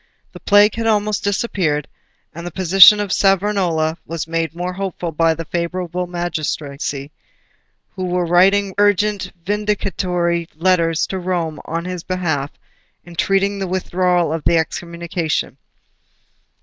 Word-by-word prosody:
The - - -11
Plague 205 +1 +5
had 225 0 -2
almost 210 -1 +1
disappeared, 190 - -1 0.5
and 170 +1 -8
the 175 - -4
position 190 +4 +7
of 205 -2 -1
Savonarola 185 -5 +1
was 165 0 -5
made 165 0 -2
more 180 +1 -3
hopeful 180 -3 -4
by 165 +1 +2
a 165 +1 -6
favourable 175 +1 -3
magistracy, 150 -5 -4 0.8
who 185 -1 -5
were 180 0 0
writing 190 +3 +3
urgent 205 -1 +2
vindicatory 185 -4 -1
letters 165 -1 +2
to 190 - -4
Rome 175 -4 -2
on 165 +1 -4
his 180 -1 -4
behalf, 160 -6 -2 0.6
entreating 195 +3 0
the 195 - -2
withdrawal 180 -2 0
of 160 -2 -4
the 170 - +3
Excommunication. 170 -2 -3
180 Hz, 125 wpm, -19 LUFS, 165-195 Hz, 0.8 s, position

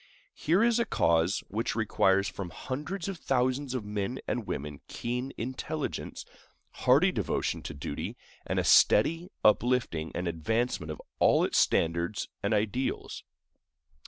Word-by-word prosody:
Here 175 +8 +2
is 235 0 +3
a 235 - +2
cause 85 +4 +2
which 105 -1 -2
requires 100 -3 +2
from 95 -3 -5
hundreds 155 - -5
of 195 -4 -5
thousands 130 +1 0
of 120 -5 -3
men 105 +4 -3
and 120 -4 -2
women 75 0 -5
keen 125 +3 -3
intelligence, 130 +5 -4 0.5
hearty - - +4
devotion 85 - -1
to 75 +2 -7
duty, 70 - -5 0.3
and - - -3
a - - +2
steady 165 - +5 0.2
uplifting 105 -8 +2
and 90 +1 -2
advancement 90 +1 -1
of 75 - -7 0.2
all - - +5
its - - +2
standards 85 +4 +1
and 100 - -1
ideals. 110 +5 -1
110 Hz, 135 wpm, -29 LUFS, 85-130 Hz, 0.5 s, steady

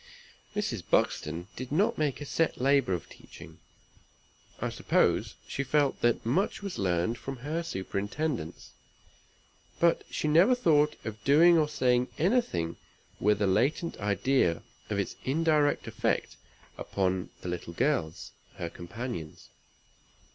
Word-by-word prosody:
Mrs. - - -2
Buxton 80 +3 0
did 130 +1 -7
not 205 +8 +2
make 150 -2 0
a - - -4
set 165 +3 0
labor 135 -6 +3
of 85 - -4
teaching; - - -14 1.0
I - - -1
suppose - - +1
she 140 - -2
felt 140 +1 +1
that 120 -1 +2
much 175 - 0
was 200 -2 -5
learned 90 +4 0
from 135 -1 -6
her 160 +3 -1
superintendence, 105 - -4 1.1
but 170 0 +3
she - - -2
never 170 +11 +5
thought 150 -10 +3
of 110 -1 -6
doing 165 +6 +6
or 155 -2 +3
saying 125 -3 +2
anything 160 - +1 0.4
with 105 0 +2
a - - +4
latent 140 - +1
idea 100 -2 +1 0.3
of - - -1
its - - -2
indirect 150 +1 +2
effect - - -1 0.4
upon 95 -1 -1
the 90 - -5
little 85 -1 -5
girls, 85 - -1 0.2
her 85 -1 -5
companions. 85 -3 -7
130 Hz, 130 wpm, -29 LUFS, 95-155 Hz, 1.1 s, doing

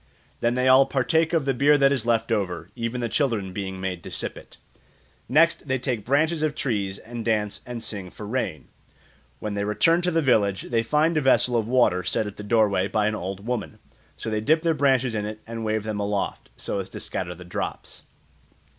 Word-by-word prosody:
Then 120 +1 +1
they 125 0 +1
all 130 +1 +7
partake 160 +5 +1
of 165 -5 +1
the 135 - +2
beer 145 +4 +4
that 140 -1 +4
is 125 -5 0
left 115 0 +1
over, 100 -5 -2
even 120 +1 -3
the 120 - 0
children 115 -7 -1
being 95 -1 -4
made 95 -2 -3
to - - -8
sip - - -4
it. - - -14 0.7
Next 160 +3 +3
they 130 0 +1
take 125 -4 -2
branches 155 +4 +2
of 155 -1 0
trees 100 -8 -2
and 120 0 -7
dance 105 -2 -1
and 120 -2 -5
sing 95 -4 -5
for 105 - -9
rain. 110 -8 -3 0.7
When 105 - -4
they 100 0 -1
return 165 +12 +3
to 180 - +1
the 165 -2 +1
village 100 -7 +2
they 115 -2 0
find 150 +7 +2
a - - -2
vessel 130 -2 +3
of 110 -2 +1
water 120 -7 +3
set 100 +4 0
at 105 -1 -7
the - - -6
doorway 105 -3 +2
by 105 0 +1
an 110 - +1
old 95 +1 -5
woman; 120 -2 -3 0.4
so 110 - -5
they 105 0 0
dip 155 +7 +2
their 165 -1 +3
branches 130 -4 +2
in 105 -1 -2
it 110 0 -6
and 115 0 -6
wave 110 -1 -1
them 110 -1 -3
aloft, 100 0 -2
so 100 - -3
as 95 0 -5
to - - -8
scatter 90 -1 -4
the 90 +1 -12
drops. 90 - -5
115 Hz, 215 wpm, -25 LUFS, 105-135 Hz, 0.7 s, all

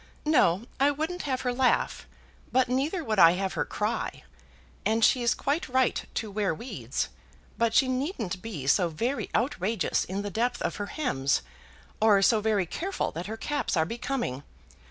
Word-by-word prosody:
"No; 225 - +3
I 275 +2 +5
wouldn't 315 +5 -2
have 260 -1 0
her 250 -1 -1
laugh; 255 0 +1 0.4
but 255 0 +3
neither 285 +8 0
would 215 -6 0
I 165 -1 +8
have 190 +1 -2
her - - -1
cry. 215 +3 -3 0.6
And 225 +1 +3
she's 240 -3 +3
quite 285 +2 -1
right 260 0 +2
to 220 -2 -3
wear 200 -5 0
weeds; 235 +11 -4 0.5
but 230 -1 +1
she 270 - +5
needn't 255 - -2
be 195 -12 -6
so 175 +5 +3
very 235 - -2
outrageous 220 -4 0
in 195 +2 -4
the 205 - -4
depth 240 +4 0
of - - -2
her 205 - -3
hems, 140 - 0 0.6
or 205 -3 +5
so 215 +1 +4
very 210 -3 +1
careful 375 - -3
that 170 +3 -5
her 220 +1 -5
caps 290 -6 -1
are 160 - +3
becoming. 235 - -3
225 Hz, 170 wpm, -28 LUFS, 195-260 Hz, 0.6 s, I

